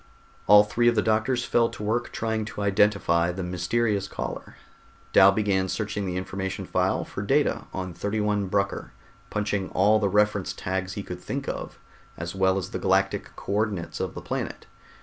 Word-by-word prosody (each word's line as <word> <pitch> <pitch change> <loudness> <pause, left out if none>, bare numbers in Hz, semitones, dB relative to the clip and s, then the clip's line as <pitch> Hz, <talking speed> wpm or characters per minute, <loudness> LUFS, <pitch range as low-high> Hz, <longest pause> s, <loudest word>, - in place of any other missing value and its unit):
All 105 +1 +9
three 120 +3 +1
of 120 - +4
the 110 - +2
doctors 110 +3 +1
fell 115 -1 +3
to - - -8
work 120 +3 -1
trying 110 -1 -1
to 105 - -6
identify 95 -4 +3
the 95 +1 -5
mysterious 95 +3 0
caller. - - -6 0.6
Dal 95 +1 +8
began 100 -2 +1
searching 105 -1 -2
the 90 0 -2
information 95 +1 -4
file - - 0
for - - -6
data - - +1
on 95 -1 -4
31 105 +2 -1
Brucker, 100 +1 -1 0.4
punching 105 -2 -1
all 105 +3 +4
the 100 -2 +1
reference 105 -2 +2
tags 95 0 -3
he 100 - -5
could 90 -1 -7
think 140 +6 -4
of, - - -5 0.4
as 85 +1 -5
well 95 0 +2
as 95 0 -4
the - - -3
galactic 95 +1 +1
co - - -7
ordinates 105 -4 -1
of - - -3
the - - -7
planet. - - -4
100 Hz, 175 wpm, -26 LUFS, 95-105 Hz, 0.6 s, All